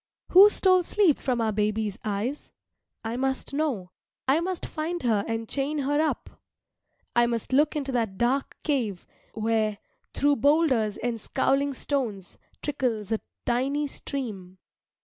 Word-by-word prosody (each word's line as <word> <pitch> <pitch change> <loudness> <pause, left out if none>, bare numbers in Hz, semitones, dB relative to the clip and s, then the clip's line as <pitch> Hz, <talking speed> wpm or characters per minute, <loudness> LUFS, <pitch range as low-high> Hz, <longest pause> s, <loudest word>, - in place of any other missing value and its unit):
Who 390 +3 +9
stole 370 -3 +4
sleep 355 -3 +2
from 250 -3 -1
our 220 -1 +1
baby's 210 0 -1
eyes? 215 +7 -3 0.5
I 225 +2 -3
must 265 +1 -2
know. 265 -12 -1 0.4
I 275 +4 +4
must 365 +1 -3
find 335 +2 -4
her 220 -4 +2
and 225 0 -3
chain 280 +4 -1
her 290 +1 +1
up. 315 - -3 0.7
I 240 0 +5
must 235 +1 -2
look 295 +3 +3
into 280 -2 -2
that 225 -6 -1
dark 260 +5 0
cave, 235 - -1 0.3
where, 220 -1 0 0.3
through 285 0 +2
boulders 265 -6 +3
and 235 -2 -3
scowling 275 +3 +1
stones, 230 -10 -3 0.2
trickles 235 -7 -2
a 220 - +1 0.3
tiny 270 +5 +1
stream. 215 -10 -6
255 Hz, 140 wpm, -26 LUFS, 220-290 Hz, 0.7 s, Who